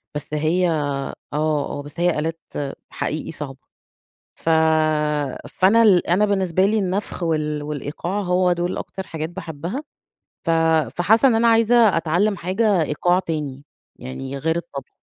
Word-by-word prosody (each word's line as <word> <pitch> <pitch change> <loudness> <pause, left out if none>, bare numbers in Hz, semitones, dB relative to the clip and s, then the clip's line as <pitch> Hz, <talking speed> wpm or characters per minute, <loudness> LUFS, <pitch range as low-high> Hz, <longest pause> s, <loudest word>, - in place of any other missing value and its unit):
بس 150 0 -4
هي 165 +4 +1
آه، 145 -4 -2 0.2
آه 150 -1 -1
بس 145 +3 -11
هي 175 -3 +2
آلات 165 +2 -3 0.5
حقيقي 155 - -4
صعبة. 140 -4 -7 0.8
ف - - -3 1.0
فأنا 200 +5 +4
ال 190 -5 +4
أنا 185 +5 +3
بالنسبة 190 -3 +1
لي 215 +2 +2
النفخ 190 -1 -2
وال 150 -2 -1
والإيقاع 150 +6 -4
هو 180 -1 +2
دول 175 +1 -2
أكتر 190 -1 -6
حاجات 160 0 -4
باحبها، 170 - -6 0.6
ف - - +2 0.5
فحاسة 220 +9 +4
إن 240 - +3
أنا 230 +1 +3
عايزة 230 -2 +5
أتعلم 175 +6 +1
حاجة 190 +2 +1
إيقاع 175 +4 +1
تاني 150 -6 -4 0.3
يعني 130 - -6
غير 160 +4 0
الطبلة. 170 -5 -7
170 Hz, 140 wpm, -22 LUFS, 150-190 Hz, 1.0 s, عايزة